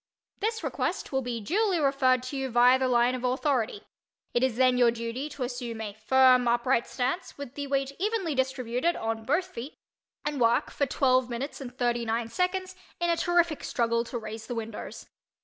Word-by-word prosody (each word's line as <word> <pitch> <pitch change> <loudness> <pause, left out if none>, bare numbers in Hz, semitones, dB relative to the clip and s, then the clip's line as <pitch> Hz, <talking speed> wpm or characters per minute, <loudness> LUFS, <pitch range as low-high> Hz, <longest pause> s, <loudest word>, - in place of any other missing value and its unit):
This 445 +2 -1
request - - -2
will 265 -1 +1
be 240 -2 -3
duly 375 - +1
referred 270 -3 +3
to 255 +2 -6
you 270 -1 -2
via 245 +2 +5
the 260 - +1
line 245 0 +3
of 255 -1 -4
authority. 250 -4 0 0.5
It 240 - +2
is 260 -3 +1
then 255 0 +4
your 240 -1 +6
duty 235 +5 -4
to 285 - -5
assume 245 -2 -4
a 210 -2 -5
firm 255 +3 +4
upright 240 +1 +2
stance, 260 +8 -3
with 280 -3 -7
the 285 0 -5
weight 275 0 0
evenly 400 -5 0
distributed 260 +3 0
on 225 0 -3
both 310 +8 +1
feet, 290 -6 -8 0.5
and 295 -3 -2
work 230 0 +3
for 280 - 0
twelve 255 -1 +2
minutes 255 +5 -5
and 250 -1 -8
thirty 240 -1 +1
nine 230 0 -1
seconds 370 +6 -1 0.2
in 345 0 +1
a - - +3
terrific 340 -2 +1
struggle 235 0 0
to 240 - -5
raise 220 0 -7
the 245 - -4
windows. 225 -1 -6
255 Hz, 190 wpm, -28 LUFS, 235-285 Hz, 0.5 s, your